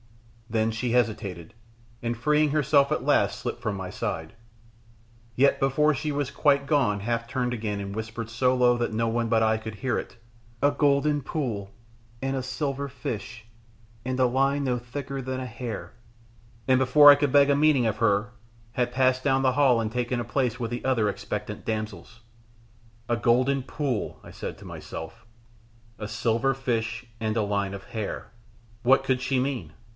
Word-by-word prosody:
Then 110 0 +1
she 115 +2 -2
hesitated, 105 -8 -1 0.5
and 120 -1 -2
freeing 150 +5 +2
herself 140 -1 +3
at 155 - -1
last - - +2
slipped - - -4
from 110 -2 -2
my 95 -1 -5
side, 80 -3 -4 1.0
yet 140 +2 +4
before 150 +3 +3
she 150 +2 -2
was 140 -1 -2
quite 140 -2 +2
gone 135 -9 +2
half 115 +2 -1
turned 125 -1 -1
again 105 -3 -3
and 100 0 -5
whispered 110 +1 -5
so 125 +2 +2
low 125 -1 +4
that 120 -1 -1
no 115 +1 0
one 115 0 0
but 110 0 +3
I 110 0 +3
could 110 0 -7
hear 130 +3 -1
it, - - -6 0.4
"A 145 +1 +4
golden 145 0 +2
pool, 115 -11 -3 0.5
and 135 0 -1
a 130 - -2
silver 140 +1 -3
fish, 115 -3 -6 0.6
and 130 +1 -2
a 130 - +5
line 135 +3 +1
no 125 -2 +1
thicker 135 +3 -5
than 130 0 -4
a 130 - -4
hair!" 120 -1 -6 0.7
and 130 -1 +4
before 145 +3 +8
I - - +8
could 145 -1 0
beg 140 0 +5
a 140 - +4
meaning 145 -4 +4
of 110 -2 0
her, 105 +1 +1 0.4
had 125 -2 0
passed 130 0 +2
down 135 -1 +2
the 130 -1 +3
hall 135 -4 +4
and 110 -1 -1
taken 125 +1 -1
a 120 - -3
place 125 0 -1
with 115 -1 -3
the 120 - -4
other 120 -5 +2
expectant - - -5
damsels. 110 0 -5 0.9
"A 120 - +1
golden 130 +3 +2
pool," 130 -4 -3
I - - -11
said - - -6
to - - -13
myself, 80 +9 -8 0.7
"a 105 - -4
silver 115 +4 +1
fish, 115 -2 -2 0.2
and 110 0 -1
a 110 - +2
line 100 -1 -1
of 100 - -9
hair." 110 -3 -5 0.5
What 135 +3 +4
could 130 -1 0
she 130 0 +1
mean? 125 - -3
125 Hz, 180 wpm, -26 LUFS, 110-135 Hz, 1.0 s, before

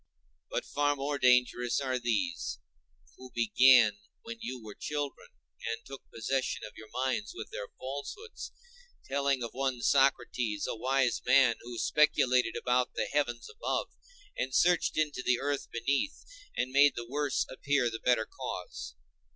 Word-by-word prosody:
But - - -2
far 145 0 +1
more 140 +1 -2
dangerous 125 -1 +3
are 130 -2 -1
these, 245 - -1 0.6
who 130 0 -12
began 120 -2 +5 0.2
when 230 0 -7
you 130 - -5
were 105 -1 -8
children, 145 +2 -4 0.4
and 115 0 -4
took 135 -1 -9
possession 130 +4 -2
of 105 - -11
your 110 - -12
minds 130 - -1
with - - -7
their - - -5
falsehoods, 145 - -7 0.5
telling 140 -2 0
of 115 - -4
one 130 -2 -2
Socrates, 125 -6 +2
a - - -3
wise 130 +1 +1
man, 130 -2 +5
who 120 0 -8
speculated 130 -4 +3
about 125 0 +1
the - - 0
heaven 120 -5 0
above, 475 - -2 0.5
and 130 0 -2
searched 175 -2 +3
into 150 -4 0
the 125 -1 +2
earth 145 -1 -2
beneath, 140 - -1 0.3
and 125 - 0
made 140 +1 +5
the 120 - -5
worse 145 +2 0
appear 135 -2 0
the 115 - -5
better 120 -3 +2
cause. - - -6
130 Hz, 150 wpm, -30 LUFS, 120-145 Hz, 0.6 s, began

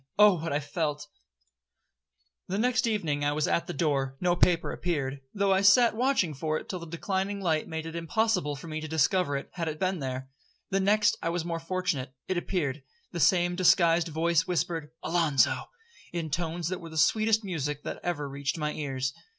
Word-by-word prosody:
—Oh 205 -4 +6
what 165 +1 -3
I 145 - +1
felt! 150 0 -3 1.4
'The 190 - -2
next 245 +2 +2
evening 160 -10 -1
I 145 0 +1
was 150 0 0
at 170 - 0
the - - -4
door; 135 -3 0
no 175 -1 +2
paper 175 -1 +2
appeared, 140 -6 -2
though 200 -1 +2
I 190 - +3
sat 225 +4 +6
watching 245 - +1
for 155 +2 -1
it - - -8
till 185 - -4
the 170 - -8
declining 190 +4 -2
light 160 -5 0
made 160 0 -4
it 165 0 -6
impossible 170 -2 0
for 140 - -10
me 155 0 -4
to 155 - -5
discover 160 -1 +2
it, 140 - -8
had 165 -2 -3
it 155 -1 -3
been 185 -1 0
there. 130 -1 -5 0.4
The 195 - +2
next 210 +2 +3
I 165 - -1
was 170 -1 -2
more 170 -1 -2
fortunate; 165 -7 -2
it 185 - -1
appeared. 150 -6 -2 0.3
The 175 - -4
same 175 0 +3
disguised 175 -2 +4
voice 165 +1 +1
whispered 165 -2 -1
'Alonzo,' 165 -6 +2 0.4
in 165 -3 -4
tones 170 +1 -2
that 185 0 -4
were 165 - -8
the 160 - -8
sweetest 215 +7 +3
music 150 -6 -3
that - - -5
ever 155 -5 -2
reached 140 +2 -3
my 150 -1 -2
ears. 135 -2 -2
165 Hz, 195 wpm, -28 LUFS, 150-185 Hz, 1.4 s, Oh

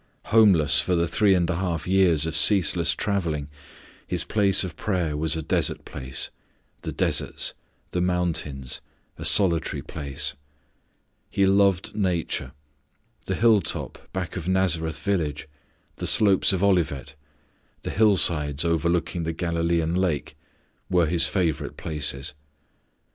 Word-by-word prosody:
Homeless 100 -9 +6
for 90 - 0
the 85 0 +1
three 95 +4 +3
and 85 -2 +1
a 85 -1 -2
half 90 -3 -3
years 90 -5 +3
of 80 0 -3
ceaseless 85 0 +3
travelling, 85 -8 -2 0.6
His - - -1
place 100 -3 +3
of 90 -4 -6
prayer 90 -8 -2
was 80 +2 +2
a 80 - -4
desert - - 0
place, 65 0 -4 0.5
"the - - -5
deserts," - - -1 0.4
"the 90 - -1
mountains," 85 -7 -2 0.4
"a - - -6
solitary 85 -5 +1
place." 70 -3 -2 1.0
He 100 - +1
loved 95 -1 +2
nature. 85 -9 -2 0.7
The - - -1
hilltop 110 -7 0
back 90 -2 -5
of 90 -2 -5
Nazareth 85 -4 +1
village, 80 -7 -2 0.5
the - - -2
slopes 100 -4 +4
of 95 0 -1
Olivet, 85 -10 0 0.7
the - - -4
hillsides 85 -8 +3
overlooking 85 +1 0
the 80 0 -3
Galilean 85 -1 -1
lake, 90 -5 -1 0.5
were 90 -2 +3
His 85 +1 +2
favourite 85 -6 -2
places. 75 -3 -3
85 Hz, 125 wpm, -24 LUFS, 80-95 Hz, 1.0 s, Homeless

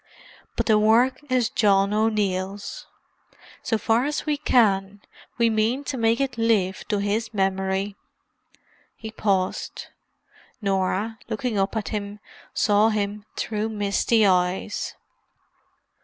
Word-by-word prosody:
But - - -1
the 215 -2 +4
work 230 +6 +3
is 250 -3 +1
John 200 -1 +3
O'Neill's. 205 - -1 0.7
So 225 - 0
far 225 +3 +1
as 295 +1 -2
we 300 -1 +1
can, 205 -8 +2 0.4
we 235 -1 +3
mean 225 +5 +1
to 285 - -4
make 230 0 +2
it 265 -4 -2
live 205 -5 +1
to 210 - 0
his 210 +3 -1
memory." 190 +1 0 1.0
He 220 -1 -8
paused. 195 -4 -2 0.7
Norah, 200 +2 -1
looking 225 -1 -2
up 195 +3 0
at 210 - -3
him, 205 -1 -5 0.3
saw 210 +1 +3
him 205 -1 -2
through 215 0 -2
misty 210 +1 +2
eyes. 185 +2 0
210 Hz, 120 wpm, -24 LUFS, 195-225 Hz, 1.0 s, the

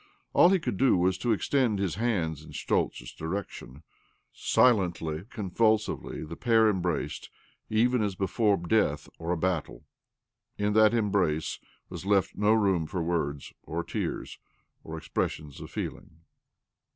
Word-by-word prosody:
All 175 - +7
he 190 - +4
could 155 - -3
do 130 -4 +4
was 90 +1 +2
to 120 - 0
extend 115 0 +1
his 95 -4 -1
hands 90 -9 -1
in - - -13
Schtoltz's - - -1
direction. 80 -5 -6 0.5
Silently, 85 -8 +2
convulsively 110 -1 0
the 85 +2 -7
pair 110 -1 +4
embraced, 90 -3 -2 0.4
even 120 +2 +2
as 100 -3 -1
before 100 +2 +1
death 85 -5 +1
or 85 - -5
a 90 - +1
battle. 85 -2 -2 0.7
In 105 0 0
that 110 +1 +5
embrace 100 -8 0 0.3
was - - -8
left 100 -1 +2
no 105 +1 +2
room 95 -7 +2
for 85 +1 -3
words 75 -5 -2
or - - -4
tears - - -4 0.4
or 80 0 -7
expressions 75 -2 -3
of - - -8
feeling - - -5
95 Hz, 140 wpm, -28 LUFS, 80-110 Hz, 0.7 s, All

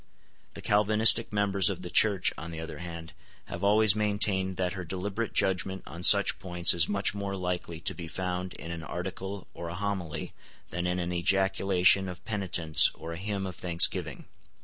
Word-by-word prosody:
The - - -10
Calvinistic 110 +2 +4
members 100 -2 +1
of 90 -2 -5
the 90 - -7
Church, 100 -4 +2
on 80 - -8
the 80 -1 -7
other 80 - -8
hand, 85 -1 -9 0.3
have - - -8
always 105 0 +4
maintained 100 -3 0
that 90 -1 -2
her 95 -1 -6
deliberate 95 +6 -4
judgment 95 0 -1
on 85 +4 -10
such 100 +2 +7
points 90 -2 +1
is 85 -2 +1
much 100 -1 0
more 100 -1 -5
likely 90 -3 -4
to - - -2
be 85 -2 -8
found 90 +2 -4
in 85 - -8
an 85 -1 -6
Article 95 +4 -6
or 85 - -7
a 85 - -7
Homily 95 -5 -4 0.4
than 85 +2 -3
in 90 0 -1
an 90 0 -3
ejaculation 95 +1 +2
of 90 -1 -10
penitence 90 -7 +2
or 80 +1 -8
a - - -7
hymn 100 +1 -4
of 90 -2 -7
thanksgiving. 85 -2 0
95 Hz, 180 wpm, -28 LUFS, 85-100 Hz, 0.4 s, such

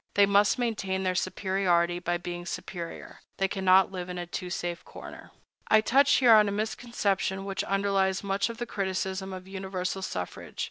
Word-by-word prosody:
They 200 - +6
must 200 +3 +3
maintain 200 -6 -1
their 185 -1 +1
superiority 180 -2 +1
by 175 0 -1
being 175 0 -6
superior. 170 -3 -7 0.2
They 195 - +2
cannot 190 -1 +4
live 180 -1 -5
in 180 - -5
a 175 - -4
too 180 +1 -5
safe 175 -1 -4
corner.I 220 - -3
touch 275 +5 +4
here 245 -4 +6
on 210 -1 +6
a - - -3
misconception 200 -3 -1
which 195 -1 -2
underlies 195 -1 +1
much 200 +2 0
of 230 - -7
the 240 - -3
criticism 190 -2 -3
of 185 0 -8
universal 190 -1 -4
suffrage. 90 - -6
190 Hz, 170 wpm, -28 LUFS, 185-200 Hz, 0.2 s, They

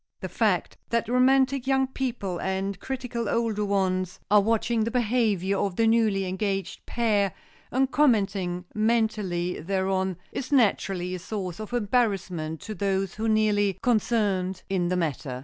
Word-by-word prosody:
The - - -4
fact - - 0
that 235 0 0
romantic 260 +1 +3
young 265 0 +3
people 240 -9 -3
and 190 0 -2
critical 250 -3 -4
older 225 -3 0
ones 185 -2 0
are 210 0 +7
watching 225 +1 +1
the 225 - -1
behavior 215 -5 +1
of 195 -3 -1
the 225 - +2
newly 220 -4 +3
engaged 195 +1 -3
pair 205 -6 +1 0.3
and 265 +1 +1
commenting 195 -10 +1
mentally 215 -6 0
thereon, 190 +1 -1
is 260 - -5
naturally 195 -8 +2
a 185 - -4
source 185 -1 -5
of 215 +1 -7
embarrassment 195 -9 0
to 220 - -6
those 195 -1 -1
most 225 0 0
nearly 205 -3 +2
concerned 205 -6 +1
in 185 -2 0
the 180 +1 0
matter. 145 -6 -2
205 Hz, 145 wpm, -26 LUFS, 190-230 Hz, 0.3 s, are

